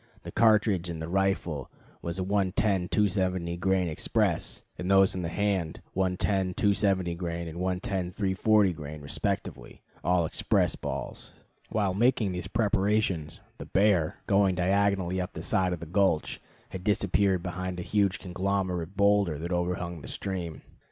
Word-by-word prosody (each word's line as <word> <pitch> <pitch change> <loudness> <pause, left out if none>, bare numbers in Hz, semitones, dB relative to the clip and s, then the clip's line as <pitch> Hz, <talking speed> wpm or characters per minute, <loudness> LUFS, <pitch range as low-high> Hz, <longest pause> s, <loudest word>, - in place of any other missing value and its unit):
The - - -7
cartridge 105 -5 +3
in 85 - -4
the 80 0 -5
rifle 90 -6 -1 0.3
was 85 +1 -4
a 95 - -1
110 95 -1 +1
270 95 -4 +1
grain 95 0 +1
express, 80 - 0
and 90 - -4
those 95 0 +5
in 95 - -3
the 85 - -3
hand 95 -4 -1
110 95 0 0
270 100 -4 +2
grain 85 -1 -4
and 80 +1 -7
110 95 0 -1
340 100 0 +2
grain 75 -1 -8
respectively, 70 -3 -4 0.2
all 90 -1 +2
express - - +1
balls. - - -6 0.4
While 100 -4 0
making 110 -1 +2
these 90 0 -4
preparations, 100 -6 0 0.2
the - - -7
bear, 95 -6 +2
going 100 -2 +3
diagonally 95 0 +1
up 90 - -5
the - - -6
side 95 -1 +2
of 90 -2 -4
the - - -5
gulch, 90 -1 +1 0.3
had 95 -1 -7
disappeared 100 -3 +2
behind 90 0 -4
a - - -3
huge 100 -1 +1
conglomerate 95 -1 -2
boulder 100 -5 +3
that 85 +4 -5
overhung 90 -1 -2
the - - -9
stream. 90 -5 -5
95 Hz, 150 wpm, -28 LUFS, 85-100 Hz, 0.4 s, those